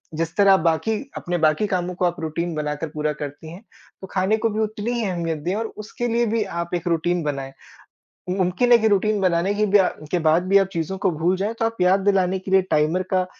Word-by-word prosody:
जिस 165 +1 -3
तरह 200 -1 +6
बाकी 165 +6 0 0.2
अपने 175 0 -2
बाकी 155 +5 +2
कामों 180 -2 -2
को 180 - 0
आप 175 -1 -1
रूटीन 165 +2 -3
बनाकर 150 +1 -3
पूरा 150 0 -2
करती 145 +2 -8
हैं, 175 +4 -10 0.4
तो 190 - -8
खाने 195 +3 +1
को 225 +1 0
भी 215 - -3
उतनी 215 +1 -2
ही 235 -2 -1
अहमियत 170 -3 -2
दें 175 +6 -3
और 225 +2 -2 0.2
उसके 240 +2 -4
लिए 235 0 +1
भी 220 -1 0
आप 170 0 -5
एक 175 0 -4
रूटीन 170 +1 0
बनाएँ। 135 -2 -4 0.8
मुमकिन 185 +6 +1
है 240 - +8
कि 220 -1 +2
रूटीन 210 +1 +1
बनाने 185 +1 +1
के 210 +1 +1
भी 205 0 +4
अ, 190 - +4 0.2
के 180 - +1
बाद 160 +1 +3
भी 200 +1 +6
आप 195 - +2
चीज़ों 170 +2 -3
को 190 0 +1
भूल 170 +3 0
जाएँ 205 +4 -2
तो - - +2
आप 225 0 -3
याद 185 +2 +4
दिलाने 190 -1 +1
के 190 +1 -8
लिए 190 0 +5
टाइमर 155 +4 +2
का, 185 -1 +2
180 Hz, 235 wpm, -22 LUFS, 165-205 Hz, 0.8 s, है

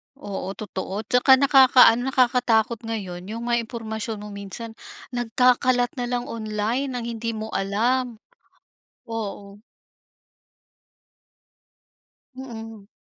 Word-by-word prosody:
Oo, 200 -8 -6
totoo 200 +1 -5
'tsaka 250 +4 +3
nakaka-ano, 260 -4 +6
nakakatakot 240 -3 +2
ngayon 185 -5 -5
yung 230 +1 -5
mga 240 0 +1
impormasyon 220 -1 -5
mo 210 - -8
minsan 200 +3 -6 0.4
nagkakalat 245 +1 +2
nalang 245 0 -1
online 220 +4 -2
ng 245 -2 -4
hindi 230 0 -3
mo 220 0 -6
alam. 235 +5 0 0.9
Oo. 205 -3 -6 2.8
Mm. 225 -5 -9
230 Hz, 90 wpm, -24 LUFS, 210-245 Hz, 2.8 s, nakaka-ano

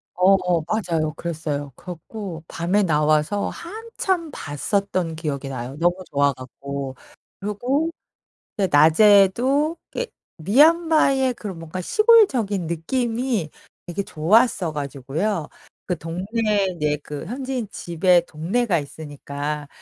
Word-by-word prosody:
어어 180 -2 +3
맞아요. 165 -7 -1
그랬어요 150 -4 -4
그래 - - -21
갖고 175 -1 -8
밤에 185 +5 +1
나와서 155 +4 +2
한참 380 -3 -3
봤었던 175 - -2
기억이 145 -4 -4
나요, 130 +1 -5
너무 175 +1 +3 0.2
좋아 140 -1 +3
갖고. 135 +1 -7 0.4
그리고 250 +10 -1 0.8
낮에도 205 - +5
그게 - - -3 0.3
미얀마의 275 - +4
그런 195 -7 -7
뭔가 165 +3 -6
시골적인 260 - +4
느낌이 225 - -1 0.4
되게 175 +3 -3
좋았어 180 +1 +2
가지고요 150 +6 -3 0.4
그 180 - -1
동네에 200 +5 -1
인제 150 -4 -1
그 150 +1 -6
현지인 255 -1 -4
집에 175 +1 +2
동네가 180 +5 0
있으니까 145 0 -6
180 Hz, 255 characters per minute, -22 LUFS, 155-230 Hz, 0.8 s, 낮에도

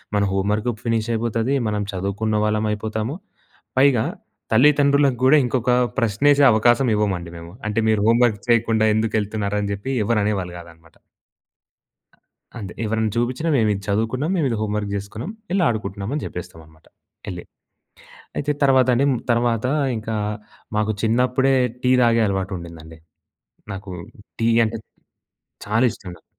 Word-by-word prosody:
మన 100 - +2
home 95 +1 0
work 110 +3 -1
ఫినిశ్ 115 -1 -1
అయిపొతది. 115 +3 0
మనం 105 -1 -1
చదువుకున్న 100 +3 -2
వాళ్ళమయిపోతాము. 110 +3 -2 0.6
పైగా 130 -5 +4 0.5
తల్లిదండ్రులకు 140 +1 +4
గూడా 145 +4 +6
ఇంకొక 125 0 0 0.3
ప్రశ్న 115 +6 +2
ఎసే 140 0 +4
అవకాశం 120 +4 +3
ఇవ్వమండి 95 -5 -1
మేము. 85 0 -10 0.2
అంటే 110 +1 0
"మీరు 110 -2 +2
హోమ్ 115 +2 +4
వర్క్ 110 -4 -1
చేయకుండా 110 -1 +3
ఎందుకెళ్తున్నారని" 105 -2 -1
చెప్పి 100 +7 -5
ఎవరనేవాళ్ళు 100 -5 0
కాదన్నమాట. 85 -1 -16 1.6
అంతే. 100 -5 -7
ఎవరైనా 110 0 0
చూపించిన 125 +7 -1
మేము 110 -3 +2
ఇది 100 - -5
చదువుకున్నాం, 115 - -1
మేము 155 -6 +1
ఇది 115 - -1
హోమ్ 105 -1 -2
వర్క్ 105 -1 -3
చేసుకున్నాం, 105 - -6 0.2
ఎళ్లి 190 -1 +2
ఆడుకుంటున్నాం 100 -3 -3
అని 150 - -3
చెప్పేస్తామన్నమాట 80 -2 -10 0.4
ఎళ్లి. - - -6 0.9
అయితే 145 +1 0
తర్వాత 130 -2 +4
అండి, 135 +4 +2 0.3
తర్వాత 120 -1 +1 0.3
ఇంకా 110 0 -4 0.6
మాకు 105 0 +1
చిన్నప్పుడే 125 +4 +2 0.3
టీ 125 - +3
తాగే 115 -1 +4
అలవాటుండిందండి. 85 -5 -5 0.8
నాకు 95 0 -8 0.5
టీ 115 - +2 0.2
అంటే 115 +1 -3 0.9
చాలా 110 +5 +2
ఇష్టం 95 - -11
నాకు. - - -22
110 Hz, 130 wpm, -21 LUFS, 100-120 Hz, 1.6 s, గూడా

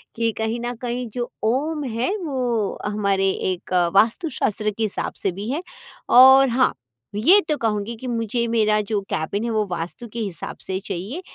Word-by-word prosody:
कि 230 0 +1
कहीं 220 +1 -1
न 240 +1 -3
कहीं, 245 0 -3
जो 240 -1 -3
ओम 290 +7 0
है, 250 - -1
वो 250 - -2
हमारे 200 -2 +1 0.2
एक 185 0 -6 0.2
वास्तुशास्त्र 220 - +2
के 225 - -1
हिसाब 215 - -2
से 195 - +1
भी 200 +5 -6
है, 300 +5 -2 0.5
और 265 +1 +8
हाँ, 255 +2 +2 0.4
ये 335 - +6
तो 305 - +2
कहूँगी 220 -1 -1
कि 255 +3 -8
मुझे, 235 0 -1
मेरा 215 -2 +2
जो 215 -2 0
कैबिन 195 +7 -2
है, 235 - -1
वो 215 -1 +1
वास्तु 175 +8 -5
के 235 - -4
हिसाब 200 -6 -5
से 190 - -5
ही 190 - -1
चाहिए 205 - -5
230 Hz, 180 wpm, -22 LUFS, 210-250 Hz, 0.5 s, और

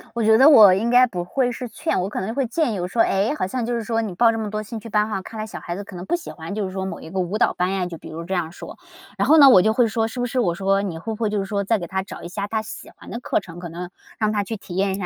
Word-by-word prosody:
我 235 - 0
觉 220 +1 +5
得 270 +5 +8
我 215 -10 +9
应 215 +5 0
该 250 +1 +6
不 180 -6 -4
会 250 +6 0
是 245 +1 -6
劝， 275 - -2
我 185 - -2
可 - - -4
能 190 - -3
就 - - -3
会 275 -1 +1
建 270 0 0
议 200 - -3
我 175 - -2
说， 225 +5 +1
哎， 200 +3 +2
好 245 - -1
像 240 +4 -3
就 240 - -2
是 230 - -2
说 225 +1 -1
你 215 -5 -4
报 230 +4 +5
这 225 - -3
么 215 -1 -3
多 215 +1 -3
兴 220 +1 -7
趣 230 - -10
班 210 0 +1
哈， 200 -3 -3
看 220 +3 -9
来 215 - -3
小 220 - -8
孩 175 - -5
子 200 - -6
可 195 - -12
能 175 +1 -7
不 345 - 0
喜 345 - -7
欢 165 +4 -7
就 210 -2 -1
是 185 - -5
说 190 0 -4
某 190 - -6
一 - - -10
个 190 +3 -3
舞 185 +3 -1
蹈 - - +2
班 180 +1 -1
呀， 190 -2 -1
就 175 -2 -7
比 - - -11
如 165 +1 -6
这 180 +3 -5
样 170 -3 -1
说。 - - -10 0.4
然 - - +1
后 315 - +6
呢 280 -3 +9
我 190 -8 +7
就 220 +3 +2
会 240 +1 +3
说， 225 0 0
是 235 +3 -7
不 245 - 0
是 250 +1 -2
我 175 -8 +1
说 195 +1 +1
你 185 -5 -4
会 220 +7 -5
不 - - -7
会 220 - +1
就 210 0 -1
是 195 - -2
说 200 0 -2
再 225 +3 +1
给 175 -4 -6
他 190 +2 -2
找 - - -10
一 - - -5
下 200 +3 -4
他 220 +1 -1
喜 220 - -9
欢 - - -14
的 235 - -5
课 - - 0
程， 175 -3 -11
可 175 -1 -7
能 175 +2 -7 0.3
让 215 -1 +1
他 205 -1 0
去 225 +3 -5
体 190 -3 -10
验 195 +1 +1
一 - - -2
下， 195 - -4
205 Hz, 400 characters per minute, -22 LUFS, 185-230 Hz, 0.4 s, 我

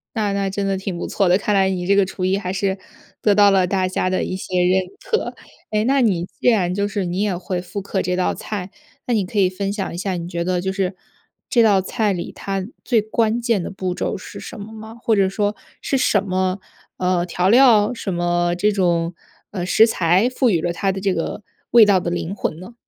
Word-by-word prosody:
那 210 -3 0
那 200 -1 0
真 195 +1 -2
的 195 0 0
挺 190 -2 -4
不 - - -4
错 195 -3 +1
的， 180 - +5
看 210 0 0
来 190 -1 +3
你 180 -1 -3
这 200 - +4
个 200 -1 +4
厨 185 0 -4
艺 190 +1 +2
还 185 -2 -3
是 190 0 -1 0.4
得 210 - +4
到 205 0 +6
了 190 -2 +3
大 185 0 0
家 185 0 -1
的 185 - 0
一 - - -3
些 185 -1 -1
认 185 +1 +3 0.2
可。 455 -2 -2 0.4
诶， 215 0 +1
那 270 +2 +3
你 185 -8 +1
既 215 - 0
然 185 -6 +2
就 200 +2 0
是 200 -2 -2
你 175 +2 -2
也 205 -3 0
会 180 0 -3
复 200 +2 -6
刻 190 0 -2
这 180 0 -1
道 180 0 +1
菜， 195 -3 -6 0.3
那 245 - 0
你 210 -4 +1
可 205 +3 -2
以 185 -2 +4
分 195 +1 -3
享 200 -3 -4
一 - - -6
下， 190 +1 -2
你 170 0 -5
觉 170 -1 -3
得 180 0 0
就 190 +2 -2
是 190 -1 -1 0.5
这 235 - +4
道 200 -4 +4
菜 215 +2 0
里 180 -3 -4
它 195 -1 -4 0.2
最 235 -4 +2
关 220 +1 0
键 230 -6 0
的 - - -5
步 185 -1 -3
骤 - - -2
是 - - -10
什 - - -9
么 210 +2 -9
吗？ 220 +1 -10
或 225 - +2
者 195 -2 +3
说 205 +1 -1 0.3
是 275 - 0
什 210 -6 +2
么， 185 0 -1 0.4
呃， 180 -1 +1
调 180 +1 0
料 230 -1 +5
什 205 -5 -4
么 175 0 +1
这 205 +4 +2
种， 175 -3 +1 0.4
呃， 185 -4 -3
食 220 +5 +5
材 185 +1 +2
赋 255 0 +1
予 170 -6 +1
了 170 - -1
它 195 +3 0
的 190 - -4
这 195 -1 0
个 165 +4 -3 0.3
味 235 -2 +8
道 195 -3 +3
的 175 - -3
灵 175 +2 -3
魂 160 - -3
呢？ 185 +6 -11
195 Hz, 260 characters per minute, -21 LUFS, 180-210 Hz, 0.5 s, 味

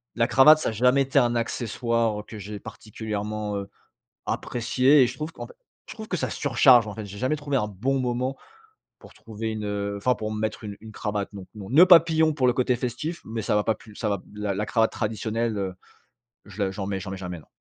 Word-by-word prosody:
La 115 0 +2
cravate 150 +4 +7
ça - - -1
a - - -3
jamais 125 +5 +3
été 135 +1 +2
un 120 -2 +2
accessoire 115 -2 -1
que 110 - -10
j'ai 105 +1 -7
particulièrement, 105 -1 -5
heu, 100 0 -6 0.6
apprécié 130 +4 +2
et - - +3
je 125 - -6
trouve, 155 +3 -5
qu'en - - -8
f - - -14 0.4
je - - -6
trouve 220 -2 -8
que - - -1
ça - - -2
surcharge, 125 -4 +4
en 105 - -6
fait, 110 -2 -6
j'ai 100 0 -9
jamais 130 +6 0
trouvé 145 -1 -3
un 105 -4 0
bon 120 +8 -1
moment, 125 +1 -1 0.6
pour - - -16
trouver 110 0 -6
une, 110 -1 -4
heu 100 0 -3
enfin 125 +5 +1
pour 110 0 -4
me 110 - -4
mettre 110 +1 -3
une 100 -1 -7
une 110 0 -11
cravate, 105 -1 -3
non, 100 -2 -8
non. 100 -2 -8
Noeud 155 +9 +7
papillon, 160 -2 +6
pour 130 -4 +1
le 125 - +4
côté 125 0 +1
festif, 130 +8 -4
mais 110 0 -4
ça 105 - 0
va 105 - +2
pas 110 - +1
plus 110 - -16
ça 110 - -3
va 100 -3 -1
la 105 -1 -2
la 105 +2 -2
cravate 110 0 +2
traditionnelle, 110 0 -2
heu, 95 -2 -3 0.7
je 100 0 -6
la 95 - -1
j'en 95 0 -5
mets 95 -1 -3
j'en 95 - -7
mets 95 - -5
jamais, 90 -2 -6
non. 75 - -17
110 Hz, 240 wpm, -25 LUFS, 105-125 Hz, 0.7 s, cravate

